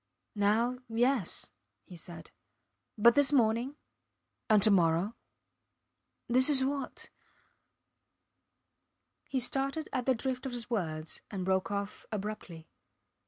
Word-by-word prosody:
Now 220 +5 +1
yes, 235 -3 0 0.3
he 180 - -13
said, 170 0 -9 0.7
but 235 +3 +6
this 285 +2 +3
morning? 240 +1 +2 0.7
And 215 -1 +6
to 215 - +5
morrow?... 175 +2 +2 1.1
This 255 +4 +4
is 265 -3 +4
what... 275 0 -4 2.2
He 270 - 0
started 275 +5 0
at 250 0 -2
the 260 - +4
drift 260 +2 -3
of 255 - -6
his 240 0 -4
words 160 -7 -2
and 190 -3 -4
broke 190 0 +1
off 200 0 -4
abruptly. 200 -6 -6
230 Hz, 115 wpm, -31 LUFS, 200-260 Hz, 2.2 s, but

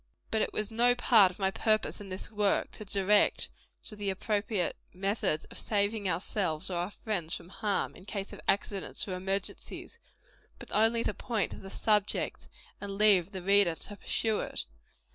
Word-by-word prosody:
But 220 - +2
it - - 0
was 215 +1 -2
no 240 +2 +4
part 225 -5 +6
of 180 - -12
my 190 -1 +1
purpose, 215 +1 0
in 200 - -9
this 185 +3 -7
work, 210 -2 +1
to 215 - -7
direct 200 +1 +2 0.3
to 215 - -6
the 205 -1 -2
appropriate 205 0 -1 0.2
methods 195 -4 0
of - - -7
saving 205 -1 0
ourselves 175 -1 -1
or 175 - -1
our 175 +2 -1
friends 195 -6 -2
from 170 0 -10
harm, 205 +1 -1
in 185 - -14
case 200 -1 -5
of - - -9
accidents 200 0 0
or 190 - -3
emergencies; 195 - -3 0.6
but - - -11
only 225 +2 +4
to - - 0
point 225 -2 -1
to - - -7
the 195 - -9
subject, 210 0 0 0.3
and 200 -1 -5
leave 200 -4 +5
the 190 -3 -6
reader 195 -3 +4
to 205 - -7
pursue 220 +1 0
it. - - -3
200 Hz, 180 wpm, -30 LUFS, 190-215 Hz, 0.6 s, part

